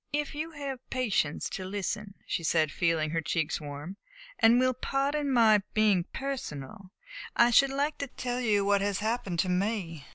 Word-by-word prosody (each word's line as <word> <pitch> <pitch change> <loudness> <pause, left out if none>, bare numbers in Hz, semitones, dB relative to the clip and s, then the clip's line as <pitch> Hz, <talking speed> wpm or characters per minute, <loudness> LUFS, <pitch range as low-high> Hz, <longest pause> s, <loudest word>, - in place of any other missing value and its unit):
"If 295 0 -2
you 310 +2 -4
have 280 -3 -5
patience 210 - 0
to 190 - -5
listen," 200 +1 -4
she 170 - -2
said, 160 -2 +2
feeling 160 -2 0
her 165 0 0
cheeks 160 0 -1
warm, 145 +6 -7 0.4
"and 230 +2 +6
will 255 0 +3
pardon 275 +3 -1
my 220 -4 +5
being 210 -5 +3
personal, 200 - -6 0.5
I 240 - +5
should 275 +3 +6
like 285 +3 -1
to 280 - -3
tell 250 -1 -4
you 210 -5 +2
what 200 0 +3
has 200 -1 0
happened 215 -4 -2
to 185 - -2
me. 180 -5 -2
210 Hz, 170 wpm, -29 LUFS, 175-255 Hz, 0.5 s, and